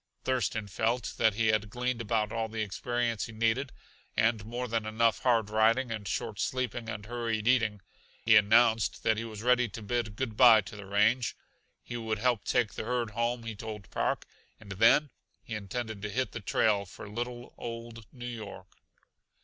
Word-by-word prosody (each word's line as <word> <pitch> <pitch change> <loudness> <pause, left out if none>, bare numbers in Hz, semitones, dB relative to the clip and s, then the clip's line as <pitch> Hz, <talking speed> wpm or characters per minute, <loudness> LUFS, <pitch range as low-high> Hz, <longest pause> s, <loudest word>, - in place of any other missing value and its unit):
Thurston 110 -4 -1
felt 115 +4 -1
that 110 -3 +3
he 110 0 +2
had 105 -1 +1
gleaned 125 +2 -2
about 110 -1 0
all 115 -1 -1
the 110 0 -2
experience 115 +2 -2
he - - -9
needed, 115 +4 0 0.5
and 110 -2 +2
more 120 +3 -4
than 115 -2 -1
enough 115 +1 +2
hard 115 -4 +2
riding 115 +3 +3
and 105 -3 -4
short 95 +2 -3
sleeping 125 -3 -2
and 105 -3 -5
hurried 115 -1 -2
eating. 115 -5 +2 0.4
He 115 0 +7
announced 110 +1 +4
that 110 -1 +2
he 115 - -2
was 110 -1 -7
ready 125 -1 +3
to 110 +2 -8
bid 110 -1 -2
good 115 -2 -3
by 115 -2 +8
to 100 +1 -10
the 100 -2 -9
range. 105 +4 +2 0.5
He 120 - -5
would 110 -1 -2
help 120 -1 +1
take 120 -4 +1
the - - -4
herd 120 -2 -1
home, 115 +1 -1
he 115 -1 -5
told 105 -2 -8
Park, - - -1 0.3
and 105 -3 -12
then 115 +8 +4 0.3
he - - -7
intended 110 +1 -4
to 105 - -3
hit 120 +2 -1
the - - -5
trail 100 -1 +1
for 95 - -10
little, 120 +3 -5
old 115 -1 -7
New 125 -2 -9
York. 105 -6 -8
115 Hz, 185 wpm, -30 LUFS, 105-120 Hz, 0.5 s, by